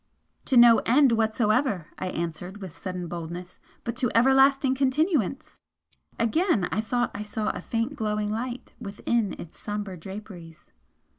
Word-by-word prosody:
"To 260 - +2
no 235 -1 +8
End 265 +2 +4
whatsoever," 220 - +1
I - - -3
answered 175 +2 -4
with 190 -5 -8
sudden 180 -2 -5
boldness 175 +1 -7 0.2
"But 235 - -3
to 255 -2 +1
everlasting 270 +2 +5
Continuance!" 275 - 0 0.6
Again 230 - +2
I 215 - 0
thought 245 +2 -1
I - - -5
saw 210 0 -2
a - - -7
faint 235 +5 -2
glowing 210 -1 -1
light 245 +3 -5
within 215 0 -1
its 170 - -10
sombre 205 -2 -4
draperies. 190 -3 -10
220 Hz, 140 wpm, -26 LUFS, 190-255 Hz, 0.6 s, no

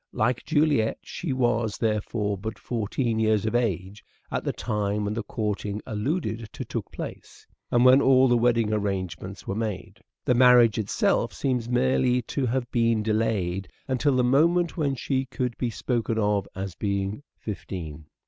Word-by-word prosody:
Like 120 +2 0
Juliet 145 -7 +2
she 170 - -5
was, 120 -4 +1
therefore, 105 -1 -1
but 110 +4 -6
fourteen 115 0 -2
juiiet. - - +2
years 110 -2 +2
of 110 - -1
age 105 -4 -1 0.3
at - - -2
the - - 0
time 105 -1 -2
when 105 - -1
the 115 - -2
courting 105 -1 -3
alluded 115 - -2
to - - -6
took - - -5
place, - - -8 0.2
and 120 +1 +3
when 130 +2 +7
all 130 -1 +5
the 120 - +4
wedding 115 -2 +2
arrangements 95 -4 -3
were - - -2
made. 105 -4 -4 0.3
The 125 - +3
marriage 120 -3 +6
itself 105 -2 +1
seems 125 -4 -1
merely 120 - +2
to 130 +3 -2
have 125 0 -2
been 115 -2 +2
delayed 105 -4 0 0.2
until 130 +1 +1
the 125 - +3
moment 165 +7 +3
when 145 -5 0
she 130 +1 -1
could 125 -2 -3
be 125 - 0
spoken 115 -1 -1
of 105 -2 +1
as 95 -1 -4
being 100 +3 -2 0.2
fifteen. 80 -7 -7
115 Hz, 165 wpm, -26 LUFS, 105-125 Hz, 0.3 s, when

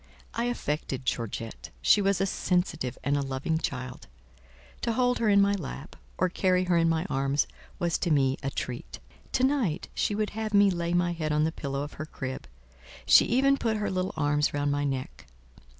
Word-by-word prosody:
I 235 - -1
affected 150 - -2
Georgette; 115 -1 -3
she 205 - +5
was 195 -1 +2
a 195 - +2
sensitive 180 -9 -1
and 140 +2 +1
a 145 - +1
loving 135 +4 -1
child: 125 -4 -5 0.7
to 230 - 0
hold 245 +1 +2
her 225 - +2
in 200 -1 +6
my 200 0 +4
lap, 155 -4 -6 0.2
or 185 - +3
carry 185 0 +2
her 180 -1 +1
in 165 -1 +4
my 165 +1 0
arms, 135 -3 +1 0.3
was 170 -1 0
to 175 - 0
me 135 -3 +3
a 135 - -1
treat. 125 -2 -5 0.4
To 255 - +2
night 260 - +1
she 205 - 0
would 215 0 -1
have 215 -1 -2
me 200 -1 +6
lay 170 -1 -1
my 175 0 +2
head 155 -2 -2
on 150 0 +2
the 160 - +1
pillow 140 -3 -3
of 145 - -7
her 155 - -5
crib; 130 -4 -6 0.6
she - - +7
even 275 +3 +3
put 225 -4 0
her 210 - -1
little 185 0 -2
arms 145 -1 +1
round 145 0 +1
my 145 0 0
neck. 130 - -4
165 Hz, 195 wpm, -28 LUFS, 140-200 Hz, 0.7 s, she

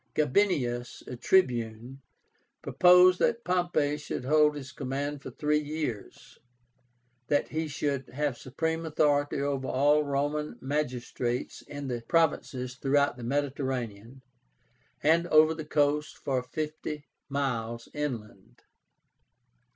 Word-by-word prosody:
GABINIUS, 135 -7 +1
a 125 - -6
Tribune, 120 -4 +1 0.6
proposed 180 0 +6
that 235 - +1
Pompey 175 -6 +1
should 145 -3 -5
hold 150 +1 +4
his 140 -2 -7
command 140 +2 -4
for - - -7
three 150 +4 +1
years; 150 -8 -5 0.9
that 145 +1 +1
he 160 +1 -2
should 140 -3 -2
have 145 -1 -1
supreme 160 +7 -3
authority 145 -2 +1
over 140 -1 -1
all 145 +3 +3
Roman 145 +1 -2
magistrates 125 -3 -3
in 145 -1 -7
the 120 -2 -3
provinces 135 -6 +1
throughout 140 0 +2
the 120 - -9
Mediterranean, 130 -3 -3 0.8
and 165 +3 +4
over 155 0 +6
the 160 -1 -7
coasts 150 0 +1
for 130 -2 -2
fifty 150 +2 -5 0.2
miles 120 -5 -2
inland. 120 -6 -6
145 Hz, 110 wpm, -29 LUFS, 125-150 Hz, 0.9 s, proposed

